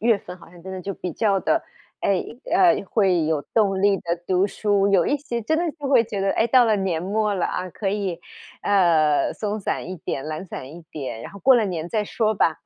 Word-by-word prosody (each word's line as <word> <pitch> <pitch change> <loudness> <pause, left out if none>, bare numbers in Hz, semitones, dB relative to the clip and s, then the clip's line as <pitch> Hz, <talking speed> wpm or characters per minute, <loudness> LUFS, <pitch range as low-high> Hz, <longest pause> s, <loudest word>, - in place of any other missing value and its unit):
月 225 -2 +3
份 180 - -10
好 170 - -16
像 175 0 -15
真 190 +2 -8
的 185 - -6
就 195 +2 -4
比 180 -2 -5
较 205 -4 +1
的 320 - +1 0.4
哎， 195 -2 +1 0.3
呃， 360 -1 +4
会 185 -6 +2
有 155 -2 +1
动 195 -4 +2
力 200 0 +4
地 - - -14 0.2
读 185 0 +2
书， 200 -1 +1
有 190 -4 +3
一 290 - +2
些 240 -4 -4
真 315 +9 0
的 340 0 0
就 285 - -4
会 255 -4 +5
觉 210 -3 -5
得， 195 0 +1
哎， - - +2
到 250 0 +6
了 220 -2 +3
年 190 -5 -1
末 210 +4 0
了 190 -3 0
啊， 185 - -4
可 195 +3 -3
以， 195 -4 -2 0.4
呃， 165 -7 +3
松 210 0 -3
散 185 - -3
一 185 - -4
点、 135 -2 -4
懒 155 +3 -5
散 130 - -7
一 175 - -11
点， 130 -6 -6
然 - - -8
后 200 - -11
过 260 +5 +5
了 230 - +3
年 170 -4 -3
再 215 +2 0
说 215 +1 0
吧。 165 -4 +2
195 Hz, 255 characters per minute, -23 LUFS, 180-220 Hz, 0.4 s, 到